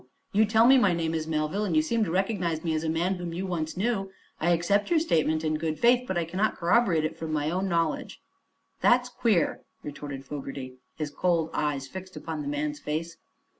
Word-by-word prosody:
You 215 +2 +5
tell 220 +2 +4
me 265 +2 +7
my 200 -7 +4
name 165 -1 -1
is 160 -1 -2
Melville, 155 +6 -1
and 185 -6 -1
you 155 - +4
seem 230 +7 +1
to - - -4
recognize 180 -3 0
me 165 -2 0
as 155 0 -1
a 160 - -1
man 170 +4 +1
whom 175 -1 -5
you 185 +2 -3
once 165 -3 -3
knew. 195 -1 0 0.3
I 170 - +1
accept 175 - +2
your 345 - +3
statement 160 - +1
in 155 -1 0
good 155 -1 -2
faith, 245 +1 +4
but 190 - -1
I 170 - 0
cannot 190 +6 0
corroborate 175 -3 +2
it 155 - -3
from 160 -1 -4
my 150 0 0
own 190 +2 -1
knowledge." 165 -3 -1 0.6
"That's 245 0 +4
queer," 225 -7 +1 0.2
retorted 145 -2 -7
Fogerty, 135 -2 -7 0.2
his 150 -2 -4
cold 165 0 0
eyes 140 -3 -1
fixed 185 +4 -9
upon 160 -2 -5
the 145 - -5
man's 145 +1 -2
face. 165 +3 -4
170 Hz, 210 wpm, -27 LUFS, 155-195 Hz, 0.6 s, me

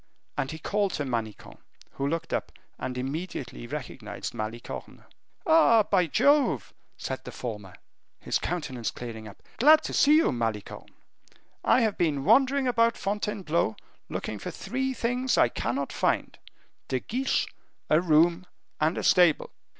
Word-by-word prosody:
And 135 -2 -2
he 160 - -5
called 200 +4 -1
to 145 - -2
Manicamp, 115 -5 -5 0.3
who 140 - -3
looked 165 +2 -3
up - - -2 0.3
and 125 -1 -4
immediately 135 - -5
recognized - - -6
Malicorne. 115 +1 -6 0.4
"Ah! 315 - +6
by 185 -4 +2
Jove!" 250 - +2 0.2
said - - -5
the - - -8
former, 105 -6 -7 0.4
his - - -1
countenance 135 -9 -3
clearing 110 -3 -7
up, 100 - -14 0.2
"glad 305 +5 +7
to - - -4
see 295 +1 +5
you, 320 - +4
Malicorne. 115 -4 -4 0.7
I 255 - +4
have 220 -3 0
been 150 -5 +1
wandering 270 +3 +4
about 230 -1 +3
Fontainebleau, 195 - -1 0.3
looking 105 - -4
for - - -5
three 265 +1 -3
things 245 +2 0
I 120 - +5
cannot 120 +8 -3
find: - - 0 0.5
De 130 - 0
Guiche, 260 - 0 0.4
a 155 +2 +4
room, 170 +2 +3 0.3
and 155 +3 +1
a - - -2
stable." 175 -4 +4
165 Hz, 140 wpm, -27 LUFS, -, 0.7 s, glad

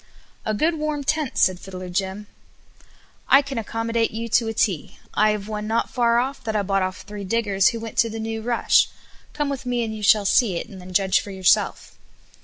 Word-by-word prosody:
"A 215 - 0
good, 315 +7 +1
warm 300 -1 -2
tent," 305 -2 -1
said 185 -1 +3
Fiddler 185 -1 -8
Tim. 190 +3 -3 1.0
"I 275 +1 +6
can 275 -3 -4
accommodate 225 +1 -1
you 230 +2 -5
to 225 +1 +2
a 225 - -2
T. 190 -9 -1 0.2
I 215 +1 +3
have 210 -1 -2
one 210 -1 -4
not 225 +1 0
far 235 -2 +2
off 265 +2 -1
that 220 -2 -3
I 205 - +1
bought 195 0 +1
off 185 0 -3
three 205 0 -8
diggers 200 -2 +2
who 230 - 0
went 225 0 -5
to 230 - +4
the 225 0 -6
new 225 0 -4
rush. 235 +1 +3 0.4
Come 295 -1 -1
with 275 -2 -4
me 245 -2 -1
and 220 -1 -4
you 215 - -7
shall 205 0 +4
see 200 -1 +3
it, 170 - -4
and 195 -5 -11
then 180 +1 -10
judge 190 0 +3
for - - -8
yourself." 190 -2 +1
220 Hz, 215 wpm, -23 LUFS, 195-235 Hz, 1.0 s, I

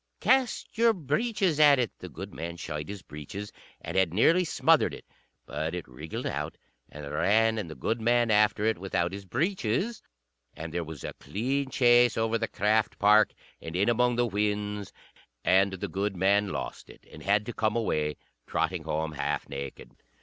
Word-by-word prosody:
"Cast 260 -4 +1
your 230 -1 +5
breeches 185 - 0
at 145 -2 +7
it!" 120 -4 0
The 90 - -8
goodman 85 -2 -7
shied 75 -2 -5
his 100 -2 -7
breeches, 85 +8 -8 0.3
and 85 - -6
had 95 -3 +2
nearly 165 - +5
smothered 160 - +3
it. - - -13 0.4
But 80 +2 -3
it 90 - -6
wriggled 75 +6 -7
out - - -3 0.3
and 75 -1 -9
ran, 110 +9 +2
and 95 -6 -5
the 80 - -8
goodman 115 - +1
after 105 0 +3
it 110 -4 +1
without 90 -2 -1
his 100 0 -7
breeches; 170 - -1 0.5
and 80 0 -7
there 85 0 -1
was 80 -2 -9
a - - -5
clean 130 +6 -2
chase 120 -2 +4
over 115 0 +1
the 115 - -1
craft 105 +1 +1
park, 105 +1 +5 0.3
and 80 - -7
in 100 +5 +2
among 120 +1 +2
the 120 0 +2
whins; 105 -1 -2 0.5
and 95 +1 +4
the 95 +2 -4
goodman 100 +2 +1
lost - - -5
it, - - -16
and 75 - -11
had 100 +5 +2
to 120 - -5
come 110 0 0
away, 75 -10 0 0.3
trotting - - -1
home 80 +1 -2
half 75 - -2
naked. 70 -1 -7
105 Hz, 170 wpm, -28 LUFS, 85-120 Hz, 0.5 s, at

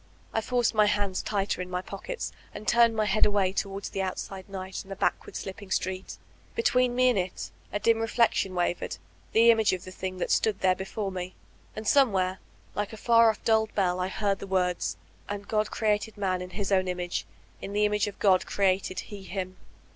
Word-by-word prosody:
I 225 - +1
forced 245 +1 +1
my 215 -1 +5
hands 200 -2 0
tighter 200 -3 -1
in 180 - -5
my 180 0 -2
pockets 200 - -5 0.2
and 215 - -8
turned 235 -1 +5
my 215 -1 +2
head 210 +1 +2
away 200 -2 +3
towards 195 0 -3
the 195 - -2
outside 190 +1 -5
night 190 -1 -5
and 195 - -18
the - - -3
bade - - +3
ward - - -12
slipping 195 +1 -6
street 185 0 -2 0.4
Between 255 - +2
me 255 0 +5
and 235 -6 +2
it, 180 0 -4 0.2
a 205 - 0
dim 230 +2 +3
reflec* 225 +1 +3
tion 190 -1 -1
wavered, 175 0 -1 0.3
the 230 +1 +7
image 220 -3 +3
of 185 - -3
the 185 - -9
thing 185 0 -5
that 180 - -2
stood 215 -3 +2
there 185 -1 +4
before 195 +2 -4
me; 185 0 -5 0.4
and 215 0 -5
somewhere, 190 -9 +3 0.3
like 205 +3 -3
a - - -7
far 230 +1 +5
off, 220 - -3
dulled 220 -1 +2
bell, 185 -3 +1
I 180 - 0
heard 200 0 -1
the - - -7
words, 180 -2 0 0.3
''And 205 0 -5
God 215 -1 +1
created 215 0 0
man 185 -3 0
in 180 - -6
hb 195 +2 -3
own 185 -1 +3
inn 180 0 -2
age, 175 0 -3 0.3
in 200 - -6
the 210 +1 +3
image 210 0 +1
of 205 - -6
God 190 -3 +3
created 190 -1 +1
He 205 -2 -9
him.'' 185 -1 -5
200 Hz, 215 wpm, -28 LUFS, 185-215 Hz, 0.4 s, the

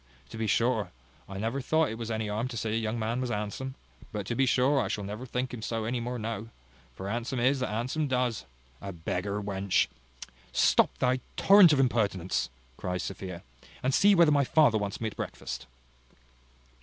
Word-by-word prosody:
To - - -8
be 110 - 0
sure, 115 -2 +1 0.4
I 95 - -6
never 115 +7 -2
thought 160 +3 +2
as - - -4
it 110 - -5
was 115 -1 -4
any 110 -1 -2
harm 110 +4 -1
to 125 -2 -6
say 110 0 -2
a - - +1
young 110 0 -1
man 115 +3 -1
was 125 - -2
handsome; 110 +5 -3 0.4
but 105 -2 -4
to 120 - -2
be 135 +2 +2
sure 130 +3 +3
I - - -1
shall 105 - -3
never 105 +6 -6
think 125 +1 -2
him 120 - -6
so 115 0 -2
any 120 +2 -1
more 125 +1 -3
now; 115 -1 -4 0.5
for 95 - -6
handsome 120 +4 -2
is 130 +3 +3
that 125 - -1
handsome 125 +8 -1
does. 125 - 0 0.4
A 100 - -5
beggar 90 +4 -3
wench! 100 -1 +1 0.3
" - - -13 0.2
"Stop - - +3
thy 130 0 +2 0.2
torrent 195 -4 +8
of 145 - +3
impertinence," 100 -8 +1 0.3
cries 90 -1 -3
Sophia, 95 -3 -6 0.4
"and 130 +1 +1
see 200 +6 +6
whether 170 -3 +6
my 145 -1 +4
father 130 -5 +4
wants 100 -1 -3
me 115 - -3
at 110 - -3
breakfast." - - -6
115 Hz, 205 wpm, -29 LUFS, 105-130 Hz, 0.5 s, torrent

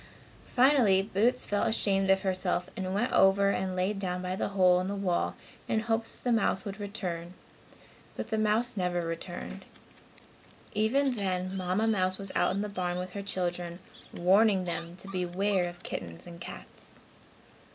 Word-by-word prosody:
Finally 245 -7 +5
Boots 220 +5 +1
felt 205 0 +1
ashamed 195 -3 +1
of 195 0 +4
herself 185 -1 -1
and 185 0 -3
went 240 +5 0
over 195 +1 +5
and 190 -1 -2
lay 185 +3 +1
down 185 -3 -3
by 180 0 -3
the - - -1
hole 185 -2 +4
in 185 - -3
the 200 - -2
wall 190 -3 0 0.3
in 220 - +1
hopes 225 0 -1
the 245 - -1
mouse 210 -4 +2
would 200 0 -6
return, 180 -4 -4 0.8
but - - -5
the 220 - +1
mouse 220 +3 +1
never 180 -2 0
returned. 165 0 -5 1.1
Even 260 +6 +2
then 185 -1 -1
Mamma 185 +3 0
mouse 185 -4 +2
was 195 -1 -4
out 185 - +2
in 200 - -1
the - - -2
barn 180 -3 -2
with 180 0 -4
her 200 - -5
children, 175 -3 -3 0.3
warning 195 +2 +4
them 170 0 -4
to 190 - -12
beware 185 0 0
of 175 +1 -13
kittens 85 -3 -6
and 170 -1 -11
cats. - - -10
190 Hz, 165 wpm, -29 LUFS, 180-205 Hz, 1.1 s, Finally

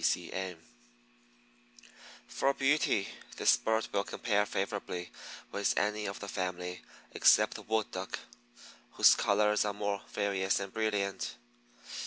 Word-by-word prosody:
C. - - -10 0.3
C. - - -9
M. 95 -2 -4 1.7
For 135 0 0
beauty 135 -7 +2 0.3
this - - +5
bird 110 0 0
will 100 0 +1
compare 105 -1 0
favorably 95 -3 -3 0.4
with 100 - 0
any 105 0 0
of 100 - -5
the 100 - -7
family 90 -1 -4 0.3
except - - +5
the - - -7
Wood 110 -1 -1
Duck, 95 +1 -4 0.8
whose - - +7
colors 105 +1 +2
are 105 -1 -1
more 100 -1 -2
various 100 -1 0
and 100 -1 -6
brilliant. 105 - -1
100 Hz, 130 wpm, -32 LUFS, 95-105 Hz, 1.7 s, whose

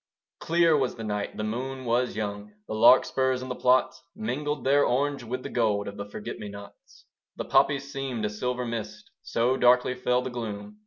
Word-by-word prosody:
Clear 165 -1 +3
was 135 -4 0
the 115 - -7
night: 105 -1 -3
the 110 - -3
moon 130 +4 -4
was 120 0 0
young: 105 -1 -5
The - - -4
larkspurs 130 +3 +4
in 130 - -7
the 125 - -3
plots 125 +1 +2
Mingled 150 -8 -3
their 140 +2 +4
orange 140 +2 0
with 125 +2 -5
the - - -5
gold 105 -4 0
Of 100 - -6
the 100 - -6
forget 105 - -7
me 105 - -6
nots. 100 0 -13 0.3
The - - -5
poppies 140 0 +2
seemed 130 -5 -3
a - - 0
silver 125 +3 -2
mist: 115 -2 -6
So 125 +3 0
darkly 125 0 +4
fell 125 0 0
the 130 - -5
gloom. 105 -3 -6
125 Hz, 195 wpm, -27 LUFS, 110-130 Hz, 0.3 s, larkspurs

